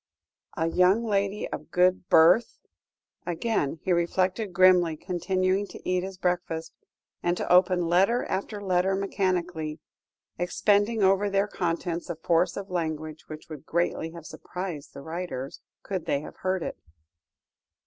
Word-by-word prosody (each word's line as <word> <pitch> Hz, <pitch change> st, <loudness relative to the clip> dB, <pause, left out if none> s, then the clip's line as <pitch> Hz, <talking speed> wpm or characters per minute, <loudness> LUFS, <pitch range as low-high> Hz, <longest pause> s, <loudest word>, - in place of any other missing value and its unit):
"A 160 Hz, -, +1 dB
young 185 Hz, +6 st, +3 dB
lady 200 Hz, -1 st, 0 dB
of -, -, -7 dB
good 180 Hz, 0 st, +2 dB
birth." 170 Hz, +8 st, +5 dB, 0.7 s
Again 175 Hz, -4 st, -1 dB
he 190 Hz, -, -1 dB
reflected 185 Hz, +4 st, 0 dB
grimly, 180 Hz, -3 st, +5 dB
continuing 185 Hz, +3 st, 0 dB
to -, -, -11 dB
eat 180 Hz, 0 st, +1 dB
his 190 Hz, 0 st, -6 dB
breakfast, 175 Hz, -3 st, -2 dB, 0.5 s
and 175 Hz, 0 st, 0 dB
to -, -, 0 dB
open 180 Hz, -1 st, +4 dB
letter 195 Hz, +8 st, +3 dB
after 205 Hz, +2 st, -3 dB
letter 190 Hz, -1 st, +1 dB
mechanically, 180 Hz, -5 st, -1 dB, 0.6 s
expending 205 Hz, +4 st, +2 dB
over 195 Hz, +2 st, +3 dB
their 200 Hz, +1 st, +1 dB
contents 170 Hz, -2 st, -2 dB
a 170 Hz, -, -2 dB
force 170 Hz, +2 st, +1 dB
of 200 Hz, -1 st, -6 dB
language 155 Hz, -3 st, -3 dB
which 155 Hz, 0 st, -9 dB
would 155 Hz, -3 st, -9 dB
greatly 170 Hz, -1 st, 0 dB
have 165 Hz, -1 st, -11 dB
surprised 180 Hz, -6 st, -7 dB
the 140 Hz, -, -8 dB
writers, 160 Hz, -5 st, -5 dB, 0.2 s
could 190 Hz, -4 st, -4 dB
they 140 Hz, -, +1 dB
have -, -, -10 dB
heard 185 Hz, -2 st, -1 dB
it. -, -, -5 dB
180 Hz, 140 wpm, -27 LUFS, 165-195 Hz, 0.7 s, birth